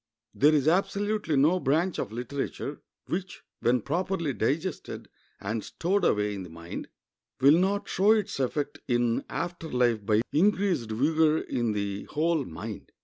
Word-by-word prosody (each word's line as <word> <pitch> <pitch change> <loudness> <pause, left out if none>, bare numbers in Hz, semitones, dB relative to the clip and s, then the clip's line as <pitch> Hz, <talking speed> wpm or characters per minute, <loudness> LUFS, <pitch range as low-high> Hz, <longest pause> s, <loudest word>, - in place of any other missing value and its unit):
There 150 +3 +4
is 145 -1 +2
absolutely 200 0 +1
no 155 +7 +4
branch 165 +5 +1
of - - -3
literature 135 +4 -4 0.2
which, 185 +1 -4 0.2
when 120 0 +2
properly 170 - -1
digested 155 +11 -2 0.3
and 105 +2 -3
stowed 195 +4 -1
away 105 0 +2
in 100 - -5
the 90 - -8
mind, 85 +1 -7 0.5
will 145 +5 +6
not 200 +2 0
show 195 +3 +2
its 210 -7 -1
effect 140 +2 -2
in 120 -2 +1
after 175 -2 -4
life 120 -4 +1
by 105 +2 +2
increased 185 - +2
vigor 155 +7 +3
in 120 -7 -1
the 100 -1 -3
whole 160 -2 0
mind. 80 - -8
145 Hz, 145 wpm, -28 LUFS, 115-175 Hz, 0.5 s, will